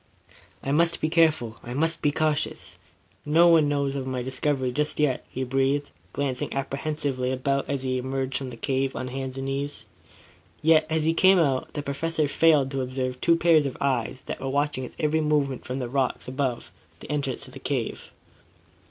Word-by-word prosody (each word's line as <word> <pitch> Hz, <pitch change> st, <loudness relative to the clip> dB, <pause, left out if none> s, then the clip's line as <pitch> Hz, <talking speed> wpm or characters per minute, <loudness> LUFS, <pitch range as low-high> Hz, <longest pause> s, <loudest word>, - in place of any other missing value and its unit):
"I 135 Hz, -, -2 dB
must 165 Hz, +3 st, +2 dB
be 155 Hz, -, 0 dB
careful. 155 Hz, -9 st, +2 dB
I 120 Hz, +1 st, -6 dB
must 165 Hz, +3 st, 0 dB
be 145 Hz, -, +2 dB
cautious. 145 Hz, -, -1 dB, 0.4 s
No 165 Hz, +4 st, +5 dB
one 160 Hz, -3 st, +5 dB
must 140 Hz, -1 st, 0 dB
know 140 Hz, -, -2 dB
of 130 Hz, -, -6 dB
my 130 Hz, -1 st, -2 dB
discovery 130 Hz, 0 st, -1 dB
just 150 Hz, +3 st, -1 dB
yet," 145 Hz, -4 st, +1 dB
he 130 Hz, -, -3 dB
breathed, 135 Hz, +2 st, 0 dB, 0.2 s
glancing 135 Hz, -3 st, -2 dB
apprehensively 135 Hz, -1 st, -2 dB
about, 135 Hz, +1 st, -1 dB
as 140 Hz, -2 st, -2 dB
he 130 Hz, -1 st, 0 dB
emerged 130 Hz, 0 st, -3 dB
from 135 Hz, -2 st, -5 dB
the 120 Hz, -, -9 dB
cave 135 Hz, +2 st, -1 dB
on 130 Hz, +1 st, -4 dB
hands 130 Hz, 0 st, -5 dB
and 135 Hz, -, -3 dB
knees. 140 Hz, +1 st, -4 dB, 0.8 s
Yet, 155 Hz, 0 st, +5 dB
as 160 Hz, -1 st, +1 dB
he 160 Hz, +1 st, +2 dB
came 190 Hz, +3 st, +5 dB
out, 140 Hz, -6 st, +1 dB
the 145 Hz, -, -3 dB
Professor 155 Hz, +2 st, 0 dB
failed 145 Hz, -2 st, +4 dB
to 135 Hz, -1 st, -1 dB
observe 130 Hz, 0 st, -3 dB
two 170 Hz, -, +4 dB
pairs 165 Hz, -3 st, +4 dB
of 135 Hz, -, -6 dB
eyes 130 Hz, -2 st, -1 dB
that -, -, -5 dB
were 135 Hz, -, -3 dB
watching 140 Hz, -1 st, 0 dB
his -, -, -11 dB
every 155 Hz, 0 st, +1 dB
movement 145 Hz, -4 st, 0 dB
from 125 Hz, -, -4 dB
the 125 Hz, -2 st, -3 dB
rocks 130 Hz, +1 st, -1 dB
above 130 Hz, -2 st, -2 dB, 0.3 s
the -, -, -8 dB
entrance 140 Hz, -4 st, -2 dB
to -, -, -10 dB
the -, -, -10 dB
cave. -, -, -3 dB
140 Hz, 195 wpm, -26 LUFS, 130-150 Hz, 0.8 s, No